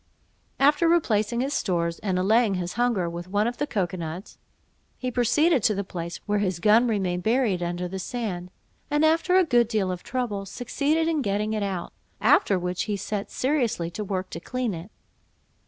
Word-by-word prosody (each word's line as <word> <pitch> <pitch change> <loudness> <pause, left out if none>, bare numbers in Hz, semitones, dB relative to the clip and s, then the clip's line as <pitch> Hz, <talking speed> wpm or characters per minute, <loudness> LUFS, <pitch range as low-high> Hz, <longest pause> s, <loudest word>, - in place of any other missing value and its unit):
After 295 +4 +4
replacing 235 -8 +2
his 275 +2 -1
stores, 170 -6 -1
and 190 -3 -1
allaying 210 +2 +3
his 180 -1 -3
hunger 235 -7 +1
with 170 +1 -6
one 205 +3 +1
of 240 +1 -2
the 290 - -1
cocoa 190 -6 -1
nuts, 170 +4 -7 0.6
he 255 -1 -3
proceeded 255 +5 +3
to 210 0 +2
the 200 - -2
place 170 -2 -6
where 210 -1 +1
his 185 -4 -1
gun 220 +6 +5
remained 190 -5 0
buried 220 -4 +1
under 175 +1 -2
the 190 +2 -5
sand; 185 -4 -4 0.4
and 295 +2 +3
after 330 +3 +3
a 375 - +5
good 240 -6 +3
deal 210 -5 0
of 180 -1 -5
trouble, 220 -6 -3
succeeded 290 +8 0
in 320 -3 +1
getting 210 -1 -1
it 215 - -1
out; 190 -4 -3 0.3
after 245 - +4
which 180 0 -2
he 210 -2 -2
set 200 +1 -4
seriously 245 - 0
to 210 - -4
work 190 -2 -3
to 165 - -5
clean 250 +3 -2
it. 170 +3 -7
210 Hz, 190 wpm, -25 LUFS, 185-250 Hz, 0.6 s, gun